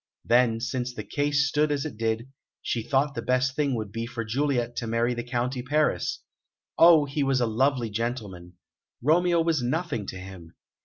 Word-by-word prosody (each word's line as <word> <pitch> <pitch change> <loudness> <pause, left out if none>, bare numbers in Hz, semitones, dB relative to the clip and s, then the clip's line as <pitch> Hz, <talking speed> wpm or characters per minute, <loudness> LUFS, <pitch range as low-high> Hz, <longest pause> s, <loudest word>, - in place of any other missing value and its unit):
Then, 120 -1 +3
since 125 +1 -3
the - - -5
case 145 -1 +1
stood 150 +1 +1
as 145 -1 -1
it 150 - -5
did, 115 +3 -2 0.3
she 115 - -1
thought 140 +4 +1
the 115 - -4
best 125 +2 +1
thing 140 -4 0
would 110 -3 -4
be 115 +2 -4
for 115 -2 -5
Juliet 120 0 -1
to 115 - -3
marry 115 +2 +1
the 120 0 -4
County 125 +1 -2
Paris. 150 +4 0 0.5
Oh, 165 -3 +7
he 140 +1 -3
was 135 -2 +2
a 120 - +2
lovely 120 0 +1
gentleman! 105 -6 -4 0.5
Romeo 170 +4 +3
was 165 -4 +1
nothing 125 - -2
to 95 - -6
him! 95 -3 -11
125 Hz, 185 wpm, -26 LUFS, 115-145 Hz, 0.5 s, Oh